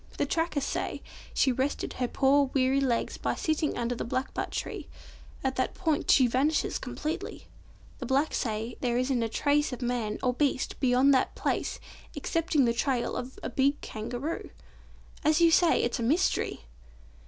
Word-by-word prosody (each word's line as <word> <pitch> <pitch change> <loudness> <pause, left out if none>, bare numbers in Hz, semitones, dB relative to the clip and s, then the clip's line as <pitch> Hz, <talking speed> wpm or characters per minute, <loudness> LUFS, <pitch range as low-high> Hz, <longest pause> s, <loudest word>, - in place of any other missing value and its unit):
The - - +1
trackers 325 -4 -1
say - - -3 0.3
she 265 - +3
rested 265 +3 -2
her 250 - -1
poor 275 +2 +3
weary 265 +1 +3
legs 245 -4 0
by - - -1
sitting 310 -1 -1
under 240 0 -1
the 240 - -4
blackbutt 255 +3 -2
tree. - - -5 0.6
At 265 -1 -1
that 260 - -1
point 320 -5 -1
she 260 - +6
vanishes 270 +6 +1
completely. 305 +5 -5 0.5
The - - -5
blacks 275 +4 +1
say 225 0 -3
there 240 -2 +1
isn't 255 -1 +1
a 225 - -1
trace 290 +5 +1
of 250 0 -5
man, 235 -3 -1
or 250 -1 +2
beast, 275 0 0
beyond 260 +1 +4
that 260 - +1
place - - -1 0.4
excepting 330 -5 +1
the 235 - +2
trail 250 0 0
of 255 +1 -5
a - - -2
big 280 +4 +2
Kangaroo. 240 +9 -5 0.7
As 305 +1 +3
you 335 -1 +6
say, 340 0 +4
it's 240 - -1
a - - -2
mystery!" 310 +11 +1
265 Hz, 165 wpm, -28 LUFS, 245-295 Hz, 0.7 s, she